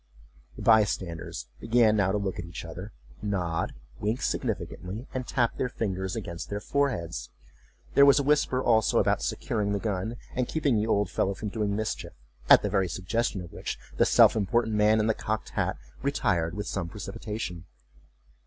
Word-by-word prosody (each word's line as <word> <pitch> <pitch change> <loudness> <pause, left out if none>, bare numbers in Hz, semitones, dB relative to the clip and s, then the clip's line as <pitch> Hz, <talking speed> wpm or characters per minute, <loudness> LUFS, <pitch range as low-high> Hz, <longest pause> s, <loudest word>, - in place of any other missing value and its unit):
The - - -8
by 110 -1 +7
standers 85 -9 -4
began 115 -2 +4
now 100 -2 +2
to 105 - +1
look 100 -2 -3
at 85 - -4
each 85 0 -7
other, 90 +6 -8 0.3
nod, 90 -5 -1 0.2
wink 110 +4 -1
significantly, 100 +7 -3
and 130 -1 -3
tap 120 -3 +1
their 125 - 0
fingers 95 -5 -2
against 85 -6 -5
their 100 - -2
foreheads. 85 - -1 0.6
There 140 0 +7
was 140 -2 +7
a 140 - +2
whisper 140 -3 +2
also, 110 -2 +3
about - - +3
securing 105 -5 -1
the 100 - 0
gun, 105 +2 -2 0.2
and 125 -1 0
keeping 145 -6 +1
the 105 +1 +1
old 100 -4 +1
fellow 100 0 0
from 105 - -4
doing 105 -1 -1
mischief, 110 +1 -3 0.4
at - - +9
the - - +1
very 95 -3 +2
suggestion 100 +3 -1
of 85 - -10
which - - -4 0.2
the - - +5
self - - +6
important 110 +2 +1
man 105 +1 +4
in 105 - +2
the 110 - +3
cocked 110 +1 -3
hat - - -1 0.2
retired 90 -12 0
with 105 - -3
some 90 -4 -3
precipitation. 95 -3 -5
105 Hz, 180 wpm, -28 LUFS, 95-115 Hz, 0.6 s, at